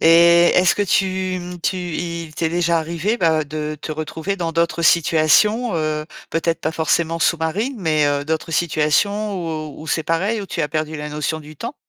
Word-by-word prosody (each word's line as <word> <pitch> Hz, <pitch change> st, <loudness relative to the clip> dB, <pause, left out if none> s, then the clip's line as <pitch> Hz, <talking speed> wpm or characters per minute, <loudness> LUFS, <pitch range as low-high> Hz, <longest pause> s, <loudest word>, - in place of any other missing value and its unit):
Et 170 Hz, +1 st, +6 dB
est-ce 180 Hz, -1 st, +4 dB
que 205 Hz, -, +2 dB
tu, 185 Hz, -1 st, 0 dB
mmh, 175 Hz, 0 st, -8 dB
tu 185 Hz, -, -1 dB
il 170 Hz, -2 st, -4 dB
t'est 160 Hz, -, 0 dB
déjà 170 Hz, 0 st, +1 dB
arrivé, 170 Hz, +7 st, -1 dB
bah, 160 Hz, -6 st, +2 dB
de 150 Hz, +1 st, -5 dB
te -, -, -6 dB
retrouver 160 Hz, +5 st, -4 dB
dans 170 Hz, -3 st, -3 dB
d'autres 170 Hz, 0 st, 0 dB
situations, 170 Hz, -, +3 dB
heu, 155 Hz, -1 st, -1 dB, 0.3 s
peut-être 165 Hz, 0 st, -1 dB
pas -, -, -1 dB
forcément 165 Hz, +1 st, 0 dB
sous-marines, 170 Hz, -, 0 dB
mais 155 Hz, -5 st, +2 dB
heu, 145 Hz, 0 st, 0 dB
d'autres 160 Hz, +1 st, -3 dB
situations 175 Hz, +7 st, +1 dB, 0.4 s
où -, -, -12 dB
où -, -, -10 dB
c'est 160 Hz, -, 0 dB
pareil, 195 Hz, +7 st, 0 dB
où 200 Hz, -, -6 dB
tu 165 Hz, -, -4 dB
as 150 Hz, -, -1 dB
perdu 155 Hz, +1 st, -2 dB
la 150 Hz, 0 st, -5 dB
notion 150 Hz, +1 st, -3 dB
du 155 Hz, 0 st, -13 dB
temps? -, -, -6 dB
165 Hz, 190 wpm, -20 LUFS, 155-180 Hz, 0.4 s, Et